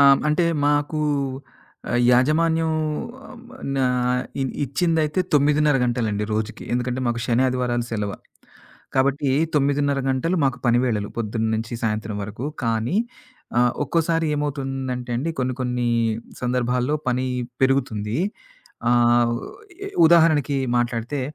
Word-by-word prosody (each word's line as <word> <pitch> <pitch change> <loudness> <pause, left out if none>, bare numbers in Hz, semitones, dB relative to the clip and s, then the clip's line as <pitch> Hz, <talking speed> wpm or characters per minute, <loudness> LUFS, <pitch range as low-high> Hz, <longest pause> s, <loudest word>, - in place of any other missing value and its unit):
ఆ! - - +7 0.3
అంటే 155 +3 +2 0.2
మాకూ 145 +1 +1 0.9
ఆహ్, 120 - +2
యాజమాన్యం 160 +6 +3 0.6
ఆహ్, 260 - -11 0.2
వమ 260 - -12 0.2
న - - -1 0.6
ఇ - - +2 0.2
ఇచ్చిందైతే 155 +3 0
9:30 150 0 +4
గంటలండి 110 -4 -1
రోజుకి. 110 +2 -3
ఎందుకంటే, 125 +1 -1
మాకు 120 0 -1
శని 120 +2 +2
ఆదివారాలు 125 -2 0
సెలవ. 105 -3 -2 0.8
కాబట్టి 135 +1 +2 0.3
9:30 140 0 +2
గంటలు 150 +8 0
మాకు 135 -2 +1
పనివేళలు. 120 -4 +1
పొద్దున 110 0 -1
నుంచి 115 +2 -4
సాయంత్రం 110 -1 -2
వరకు. 110 +5 -6 0.2
కానీ, 115 +6 0 0.6
ఆహ్, 120 -1 +4
ఒక్కోసారి 165 +2 +1
ఏమవుతుందంటే 135 -4 -3
అండి, 165 +6 -1
కొన్ని 130 -1 -1
కొన్ని 125 -1 -1 0.5
సందర్భాల్లో 125 +2 0
పని 125 +1 0 0.4
పెరుగుతుంది. 120 -4 0 0.7
ఆహ్, 120 0 +4
ఉ - - -7 0.4
ఇ - - -5 0.2
ఉదాహరణకి, 155 -4 +4 0.2
మాట్లాడితే 120 +3 -1
125 Hz, 120 wpm, -23 LUFS, 120-145 Hz, 0.9 s, ఆ